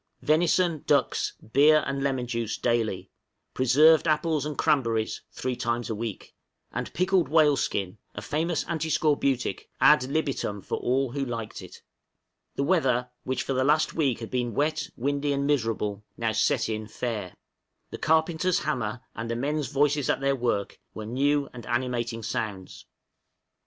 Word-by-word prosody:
Venison, 170 0 +2
ducks, 140 -3 +2 0.2
beer 150 +3 +6
and 140 0 -2
lemon 135 -3 0
juice, 115 -3 -3
daily; 115 -5 -1 0.4
preserved 150 +6 +5
apples 155 -1 +1
and 150 - -5
cranberries 115 -6 +1
three 130 -1 -3
times 120 -2 -2
a - - 0
week; 110 -2 -6 0.4
and - - -4
pickled 185 -1 +2
whale 150 -2 +5
skin 100 -5 -2 0.2
a - - -5
famous 160 +2 -1
antiscorbutic 150 -5 0
ad 150 -1 +6
libitum 140 -9 -1
for 95 - -4
all 130 0 0
who 140 +1 -2
liked 115 -4 -5
it. - - -12 0.7
The 140 - 0
weather, 130 -7 +1
which 130 - -1
for 135 - -2
the 130 0 +1
last 150 +3 +2
week 135 -8 0
had 115 - -7
been 120 -3 -1
wet, 155 +2 0
windy, 140 +3 0
and 140 0 -1
miserable, 110 -7 -1
now 115 -1 0
set 110 +3 +1
in 110 -1 -3
fair. 110 -5 -4 0.6
The - - -6
carpenter's 160 +4 +2
hammer, 125 -6 -2
and 115 0 -5
the 115 - -1
men's 145 +3 -1
voices 145 +2 +1
at - - +2
their 140 0 +1
work, 120 -6 -2 0.2
were 110 - -6
new 140 +5 +1
and 120 -2 -9
animating 120 -2 -2
sounds. 100 -3 -4
135 Hz, 155 wpm, -27 LUFS, 115-150 Hz, 0.7 s, beer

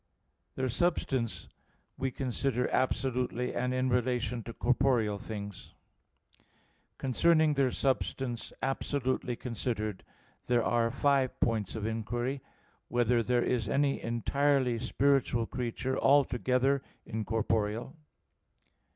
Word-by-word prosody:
Their 130 0 -1
substance 130 -5 0 0.5
we 135 - -1
consider 125 -1 -1
absolutely 125 -1 0
and 125 +1 -1
in 130 0 +1
relation 125 -1 0
to 115 - -5
corporeal 120 -4 +1
things. 100 -2 -7 1.2
Concerning 155 +4 +3
their 135 -2 +2
substance 130 -2 -1
absolutely 130 -2 -1
considered, 115 -4 -3 0.4
there 120 -2 +3
are 115 0 +2
five 135 0 +1
points 110 -3 0
of 110 -2 -3
inquiry: 120 +4 -2 0.5
(1) 120 - -2
Whether 120 0 +3
there 120 +1 +1
is 115 -4 0
any 140 0 +1
entirely 125 +1 +1
spiritual 130 -2 +2
creature, 125 +2 -2
altogether 135 -1 +3 0.2
incorporeal? 110 +3 -1
125 Hz, 100 wpm, -31 LUFS, 115-135 Hz, 1.2 s, Concerning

